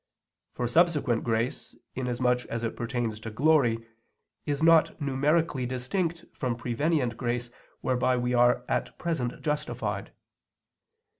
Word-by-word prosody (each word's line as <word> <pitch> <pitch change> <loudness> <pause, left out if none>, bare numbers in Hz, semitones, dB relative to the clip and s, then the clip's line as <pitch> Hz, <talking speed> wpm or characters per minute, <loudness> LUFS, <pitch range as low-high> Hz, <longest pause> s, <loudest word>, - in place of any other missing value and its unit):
For 120 - -1
subsequent 150 -5 +2
grace, 115 +1 -2 0.2
inasmuch 125 -1 0
as 115 0 -4
it 115 - -2
pertains 120 -2 -2
to 110 - -6
glory, 120 -2 +3 0.6
is 145 +1 -1
not 165 0 +5
numerically 140 -1 +1
distinct 165 +7 -2
from 125 -2 -2
prevenient 125 +1 0
grace 120 0 -2 0.3
whereby 130 0 +1
we 125 0 0
are 125 0 +4
at - - -2
present 145 -8 -2
justified. 150 0 -2
125 Hz, 120 wpm, -28 LUFS, 120-150 Hz, 0.6 s, not